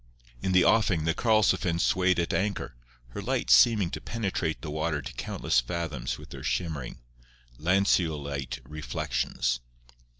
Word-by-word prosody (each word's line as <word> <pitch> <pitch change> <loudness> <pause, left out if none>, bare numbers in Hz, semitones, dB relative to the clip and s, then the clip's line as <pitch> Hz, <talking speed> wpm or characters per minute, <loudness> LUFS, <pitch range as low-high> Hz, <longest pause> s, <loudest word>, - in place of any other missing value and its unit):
In 95 - -1
the 90 -1 +5
offing 95 -8 +3
the 80 - +2
Karlsefin 100 -6 +2
swayed 90 +1 +2
at 85 - -1
anchor, 100 +1 -1 0.4
her - - -6
lights 60 - +2
seeming 95 - +5
to - - -5
penetrate 95 -8 -2
the 75 - -5
water 80 0 -1
to 70 - -7
countless 60 - 0
fathoms 75 -1 -3
with - - -13
their - - -8
shimmering, 80 -8 -3 0.6
lanceolate 75 -7 0
reflections. - - -2
85 Hz, 135 wpm, -28 LUFS, 70-95 Hz, 0.6 s, the